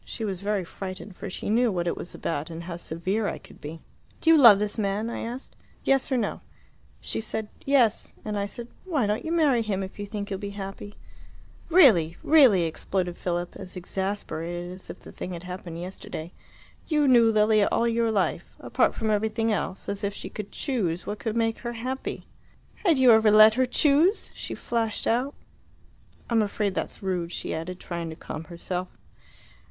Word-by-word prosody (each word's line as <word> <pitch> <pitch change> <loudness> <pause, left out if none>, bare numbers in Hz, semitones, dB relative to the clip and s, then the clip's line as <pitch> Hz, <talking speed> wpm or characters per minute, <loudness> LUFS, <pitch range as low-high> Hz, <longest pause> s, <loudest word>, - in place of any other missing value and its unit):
She 225 - -5
was 195 -3 -3
very 205 -1 0
frightened, 185 +2 -7
for 200 - -6
she - - -5
knew 235 +2 +3
what 175 -2 -1
it 170 - 0
was 175 - -7
about 155 -1 -3
and 165 0 -7
how 170 0 -6
severe 185 +6 -2
I - - -3
could - - -16
be. 160 +2 -7 0.4
'Do 325 - +4
you - - +8
love 230 -7 +10
this 210 +2 -2
man?' 210 +3 -1
I - - -4
asked. 245 +3 -6 0.3
'Yes 270 0 +2
or 260 - +3
no?' 220 -4 -2 0.6
She - - -3
said 220 -1 -4 0.2
'Yes.' 255 -6 +3 0.2
And 210 -1 -2
I 200 0 -1
said, 235 +3 -8 0.2
'Why 310 - 0
don't 210 +1 -1
you 320 - -3
marry 300 -8 +3
him 200 -3 -1
if 190 +2 -9
you 205 - -4
think 205 0 -5
you'll 195 - -2
be 200 0 -6
happy?'" 195 +1 -7 0.7
"Really 215 - +6
really," 260 - +6
exploded 175 +2 -2
Philip, 175 0 -3
as 180 - -9
exasperated 175 -2 -4
as 185 +1 -11
if - - -9
the - - -11
thing 185 - -6
had 170 0 -7
happened 180 -2 -7
yesterday. 175 -2 -7 0.6
"You 300 -3 +2
knew 235 -3 +6
Lilia 215 -1 +4
all 235 - +2
your 230 0 +1
life. 205 -4 -1
Apart - - +1
from 220 -1 0
everything 220 +2 +1
else 195 -2 -3
as 200 +1 -4
if 200 0 -1
she - - -6
could 205 -1 -7
choose 185 - -2
what 210 0 -4
could 225 0 -2
make 225 -1 +1
her 240 0 -4
happy!" 255 +3 -4 0.5
"Had 340 -7 +2
you 260 -2 +7
ever 220 -1 +6
let 215 +1 +8
her 255 +2 +2
choose?" 305 - +3
she - - -6
flashed 225 -2 -2
out. 250 +5 +1 0.9
"I'm 230 -2 +3
afraid 205 -1 -1
that's 190 - -4
rude," 180 -3 -2
she - - -3
added, 180 +3 -5
trying 170 -2 -5
to 160 - -7
calm 155 0 -7
herself. 180 +1 -4
205 Hz, 195 wpm, -26 LUFS, 180-230 Hz, 0.9 s, love